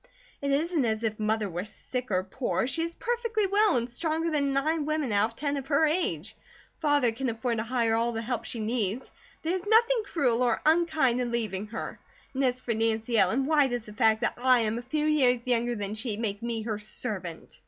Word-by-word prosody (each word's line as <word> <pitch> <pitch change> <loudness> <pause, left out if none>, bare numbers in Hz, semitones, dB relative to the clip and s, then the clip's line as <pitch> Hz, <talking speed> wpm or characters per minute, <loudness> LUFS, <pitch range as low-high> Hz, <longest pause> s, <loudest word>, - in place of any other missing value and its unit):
"It 280 - -1
isn't 310 +2 +1
as 220 -1 -1
if 220 -1 -2
Mother 215 0 0
were 175 -1 -4
sick 250 +4 -5
or 185 -2 +1
poor, 240 +8 -1
she 300 +6 0
is 335 +1 -3
perfectly 465 -3 -1
well 410 0 +3
and 235 0 -1
stronger 320 +6 -2
than 285 -2 +1
nine 300 +3 0
women 305 -5 -1
out 205 0 +4
of 230 +1 -7
ten 285 +2 -1
of 275 -1 -5
her 310 +1 +3
age; 225 - -1 0.4
Father 290 -6 +3
can 255 +3 -2
afford 230 +1 -2
to - - -1
hire 230 -1 +1
all 230 +1 +1
the 225 0 -3
help 245 +1 -2
she 235 - -4
needs; 220 +1 -2 0.3
there 325 +2 0
is 375 +1 -3
nothing 460 +2 +4
cruel 250 -10 +1
or 245 -2 +2
unkind 315 -6 +3
in 240 -1 -2
leaving 215 -4 -2
her; 225 +2 -6 0.3
and 270 +1 0
as 250 -1 +1
for 240 -2 -2
Nancy 225 +1 0
Ellen, 225 +9 +3
why 295 -2 +4
does 245 -3 -3
the 210 - -9
fact 220 0 +3
that 240 - +1
I 250 0 +4
am 225 +1 -1
a 245 +1 -13
few 305 +1 0
years 255 -6 +3
younger 240 0 +1
than 205 -1 -3
she, 220 -1 -3
make 210 -3 -2
me 230 -2 -3
her 215 -2 -3
servant? 210 0 -5
245 Hz, 220 wpm, -28 LUFS, 225-300 Hz, 0.4 s, out